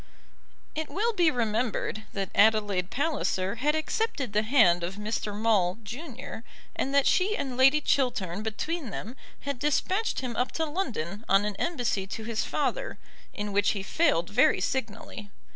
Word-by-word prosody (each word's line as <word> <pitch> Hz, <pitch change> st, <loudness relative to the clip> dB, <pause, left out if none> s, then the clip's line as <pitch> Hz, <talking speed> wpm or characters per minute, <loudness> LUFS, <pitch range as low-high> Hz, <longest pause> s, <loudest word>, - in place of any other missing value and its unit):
It 315 Hz, 0 st, -3 dB
will 455 Hz, +4 st, 0 dB
be 350 Hz, -5 st, +4 dB
remembered 225 Hz, -3 st, -1 dB
that 195 Hz, -2 st, -3 dB
Adelaide 205 Hz, -4 st, +3 dB
Palliser 245 Hz, -9 st, -1 dB
had 295 Hz, +6 st, +1 dB
accepted 315 Hz, -, -1 dB
the 210 Hz, -, +3 dB
hand 215 Hz, -8 st, +4 dB
of 180 Hz, +3 st, -3 dB
Mr. 210 Hz, 0 st, -3 dB
Maule, 210 Hz, -4 st, +2 dB
junior, 250 Hz, +1 st, -7 dB, 0.3 s
and 270 Hz, -, -1 dB
that 280 Hz, -1 st, +4 dB
she 405 Hz, +3 st, +3 dB
and 260 Hz, -2 st, -3 dB
Lady 270 Hz, +4 st, +6 dB
Chiltern 210 Hz, -11 st, 0 dB
between 260 Hz, +7 st, -3 dB
them 220 Hz, +5 st, -6 dB, 0.3 s
had 280 Hz, -3 st, -4 dB
despatched 370 Hz, -, 0 dB
him 250 Hz, -3 st, -4 dB
up 250 Hz, +2 st, 0 dB
to 325 Hz, -, 0 dB
London 225 Hz, -, -3 dB
on 195 Hz, +1 st, +4 dB
an 210 Hz, -1 st, -2 dB
embassy 240 Hz, -, -1 dB
to 220 Hz, +3 st, -6 dB
his 225 Hz, 0 st, -1 dB
father, -, -, -2 dB, 0.3 s
in 205 Hz, -1 st, -4 dB
which 205 Hz, +1 st, +3 dB
he 200 Hz, -2 st, -4 dB
failed 205 Hz, -, +1 dB
very -, -, +4 dB
signally. 225 Hz, -1 st, -4 dB
230 Hz, 160 wpm, -28 LUFS, 205-290 Hz, 0.3 s, Lady